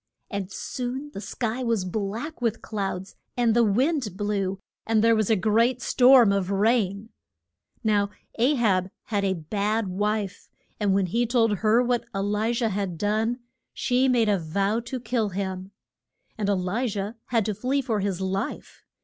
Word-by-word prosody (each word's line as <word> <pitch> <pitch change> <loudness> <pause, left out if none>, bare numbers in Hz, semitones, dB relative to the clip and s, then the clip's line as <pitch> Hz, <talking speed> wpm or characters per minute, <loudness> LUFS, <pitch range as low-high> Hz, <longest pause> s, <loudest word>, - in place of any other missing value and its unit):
And 200 -2 -4
soon 260 +7 -4
the 195 - -6
sky 235 +2 -3
was 230 -6 0
black 220 - -4
with 230 -2 -1
clouds, 195 -3 -4 0.2
and 235 -2 +3
the 240 - +5
wind 235 - +1
blew, 200 -2 -1 0.3
and 220 -1 +2
there 230 0 +5
was 215 -2 +1
a 220 - +5
great 230 +5 +2
storm 245 -2 +6
of 195 -2 0
rain. 205 0 +1 0.7
Now 205 -2 +2 0.3
A 260 +6 +4
hab 195 -7 +2
had 205 -3 -1
a 190 -1 +1
bad 205 +6 -1
wife, 205 +1 -2 0.3
and 200 -2 +2
when 195 -1 +2
he 230 +7 0
told 225 -3 +2
her 220 +5 +3
what 245 -1 0
E - - 0
li 210 +3 0
jah 235 -1 0
had 195 -4 -3
done, 220 +5 0 0.3
she 255 +1 +1
made 240 -3 +3
a 205 -2 +2
vow 195 +7 0
to 260 - -4
kill 225 -2 -1
him. 190 0 -4 0.7
And 205 -2 -2
E - - +4
li 195 +7 -1
jah 205 0 -3
had 230 -4 +1
to 215 - -1
flee 265 +7 -1
for 225 -5 -1
his 195 -2 -1
life. 190 +3 -4
215 Hz, 175 wpm, -25 LUFS, 195-235 Hz, 0.7 s, storm